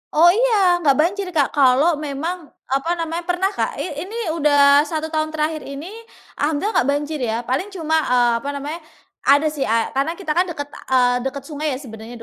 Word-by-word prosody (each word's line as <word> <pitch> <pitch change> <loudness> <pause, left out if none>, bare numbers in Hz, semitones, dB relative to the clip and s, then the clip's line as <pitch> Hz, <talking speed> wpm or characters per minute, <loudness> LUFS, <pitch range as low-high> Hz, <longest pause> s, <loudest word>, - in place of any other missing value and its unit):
Oh 340 +3 +7
iya 405 -5 +3
enggak 290 -5 +3
banjir, 385 +4 -1
Kak, 285 -4 +2
kalau 285 +4 +4
memang 310 +4 -4 0.2
apa 275 +5 0
namanya, 330 +1 -3
pernah, 360 +2 0
Kak, 400 - -2
i - - -4 0.2
ini 430 - -9 0.2
udah 285 -1 +5
1 315 0 -3
tahun 310 0 -2
terakhir 310 0 -2
ini 280 +7 -7 0.5
alhamdulillah 310 +8 0
enggak 255 - 0
banjir 295 +2 -2
ya. 230 -3 -1
Paling 260 +11 -2
cuma, 320 -3 -1
eee, 245 -1 +3
apa 275 - -5
namanya, 290 +4 -5 0.5
ada 285 +3 +5
sih 290 -3 -3
a 225 +1 +1
karena 280 +5 -1
kita 345 -4 -4
kan 355 +4 +2
deket, 300 -4 -5
eee, 250 -1 +1
deket 275 0 -6
sungai 295 -1 -3
sebenarnya 230 -3 -10
300 Hz, 185 wpm, -20 LUFS, 275-335 Hz, 0.5 s, Oh